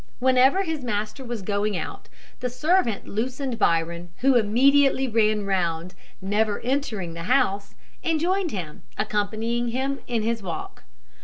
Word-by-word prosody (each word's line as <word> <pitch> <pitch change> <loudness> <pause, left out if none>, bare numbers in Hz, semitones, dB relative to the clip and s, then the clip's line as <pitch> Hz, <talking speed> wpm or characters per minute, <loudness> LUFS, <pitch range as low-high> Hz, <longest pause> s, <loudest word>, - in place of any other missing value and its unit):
Whenever 260 +8 +4
his 320 -6 -3
master 215 +3 -3
was 235 -5 -5
going 205 0 0
out, - - -6 0.3
the 250 - -2
servant 300 - +1
loosened 250 +3 -3
Byron, 170 +1 +1
who 270 +1 +5
immediately 265 +4 +4
ran 215 -2 +2
round, 175 -2 -1 0.3
never 205 +2 0
entering 230 -9 -2
the 165 0 -6
house, 200 -6 +1 0.3
and 325 -2 +1
joined 365 +2 +1
him, 175 - -6 0.2
accompanying 220 +3 -1
him 265 +3 -1
in 235 -3 -1
his 230 0 -1
walk. 175 - -6
230 Hz, 140 wpm, -25 LUFS, 200-265 Hz, 0.3 s, who